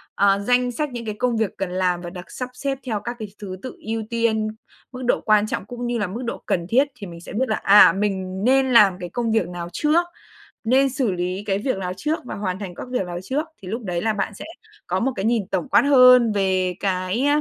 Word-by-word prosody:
ờ, 200 0 +3
danh 245 +4 +2
sách 295 +3 -3
những 240 -2 -6
cái 215 - -4
công 245 -2 +1
việc 220 -4 0
cần 195 -2 -3
làm 180 -1 0
và 175 - -6
được 180 0 -10
sắp 250 -1 -5
xếp 270 +2 -3
theo 220 -5 -2
các 240 +3 -5
cái 215 - -5
thứ 190 -3 -6
tự 255 - -7
ưu 225 0 -2
tiên, 230 -2 +1 0.4
mức 255 0 -8
độ - - +2
quan 215 0 +3
trọng 195 - -3
cũng 245 +2 -6
như 240 - -1
là 205 - 0
mức 210 +7 -6
độ 235 - -5
cần 170 -2 -1
thiết, 265 +6 +4
thì 210 -6 -8
mình 170 -1 -10
sẽ - - -10
biết 245 +3 0
là, 215 - +2
à, 205 +1 +8
mình 190 -1 -2
nên 265 +1 +3
làm 200 -5 +6
cái 175 - -6
công 230 +4 -2
việc 220 -6 +1
nào 175 -1 -6
trước, 310 - +2 0.6
nên 265 +4 +3
xử 255 -4 0
lý 180 +2 -3
cái 195 -1 +1
việc 255 +1 -1
lào 185 -1 -3
trước 305 +9 -1
và - - -6
hoàn 190 -2 -3
thành 190 -4 -7
các - - -7
việc 250 -6 0
lào 175 0 -5
trước, 280 - -2 0.2
thì 190 - -10
lúc 225 +5 -4
đấy 175 -4 -2
là 220 +2 +1
bạn 205 +1 -2
sẽ - - -8 0.4
có 185 +1 0
một 265 +5 0
cái 195 - -3
nhìn 225 -4 +1
tổng 190 +4 -2
quát - - +5
hơn 250 -4 +7
về 185 -2 +1
cái, 190 +6 0
215 Hz, 255 wpm, -22 LUFS, 185-245 Hz, 0.6 s, à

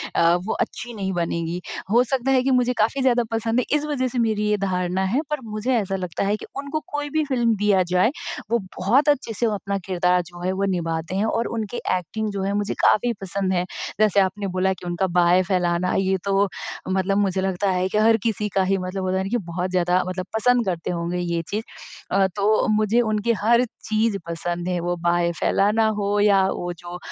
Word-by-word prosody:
अ, 170 0 +4
वो - - -1
अच्छी 240 +1 -4
नहीं 195 -3 -3
बनेगी। 170 0 -2 0.3
हो 240 +3 +5
सकता 265 +1 0
है 260 -1 +3
कि 270 - +1
मुझे 250 -1 +3
काफ़ी 225 +6 +1
ज़्यादा 245 -2 +3
पसंद 225 +2 0
है - - 0
इस 300 - -3
वज़ह 265 -4 -1
से 245 0 -3
मेरी 215 -2 +1
ये 210 - +2
धारणा 185 -1 -1
है, 230 +10 +1
पर 300 -1 -1
मुझे 220 +3 -2
ऐसा 195 -4 0
लगता 180 -1 -3
है 205 +1 +1
कि - - -9
उनको 285 +2 -3
कोई 290 0 -2
भी 310 +1 +1
फ़िल्म 240 -5 +1
दिया 205 -2 +3
जाए 185 +7 +4 0.4
वो 235 - +3 0.2
बहुत 250 +11 +3
अच्छे 260 -5 +1
से 235 - 0
अपना 200 0 -2
किरदार 180 -1 +2
जो 175 0 -12
है 185 - 0
वो 195 +1 0
निभाते 165 +1 -3
हैं, 200 +3 +1
और 230 +1 0
उनकी 220 +2 -3 0.2
एक्टिंग 215 +5 -4
जो 200 -1 -3
है 195 +1 -1
मुझे 205 0 -1
काफ़ी 240 +3 +4
पसंद 195 0 -1
है। 180 -1 0 0.3
जैसे 210 -2 +4
आपने 195 +1 0
बोला 190 +1 +2
कि 180 - -12
उनका 175 +2 0
बाहें 175 +1 +5
फैलाना, 180 -1 0
ये 190 0 +1
तो 200 0 +2 0.4
मतलब 190 +1 +1
मुझे 195 -2 +1
लगता 190 +1 0
है 185 0 +1
कि 210 - -1
हर 225 +1 +5
किसी 210 -2 -1
का 195 - +4
ही 195 +1 +1
मतलब 185 +1 -4
होता 185 0 0
है 190 - 0
ना 195 - -4
कि 240 - +1
बहुत 180 +2 -2
ज़्यादा 180 0 +2
मतलब 185 0 -3
पसंद 245 +1 +3
करते 175 -3 -2
होंगे 170 0 -2
ये 170 -1 -1
चीज़। 215 +2 -2 0.5
अ, 195 0 +3
तो 210 +2 +2
मुझे 215 +2 +3
उनकी 220 0 +1
हर 235 +3 +4 0.2
चीज़ 215 -1 +1
पसंद 175 +1 -3
है। 180 -1 0
वो 175 +1 -1
बाहें 170 0 +2
फैलाना 210 +6 +2
हो 205 +1 0
या 205 -1 +5
वो 175 0 -3
जो 175 0 -8
200 Hz, 220 wpm, -23 LUFS, 180-225 Hz, 0.5 s, हो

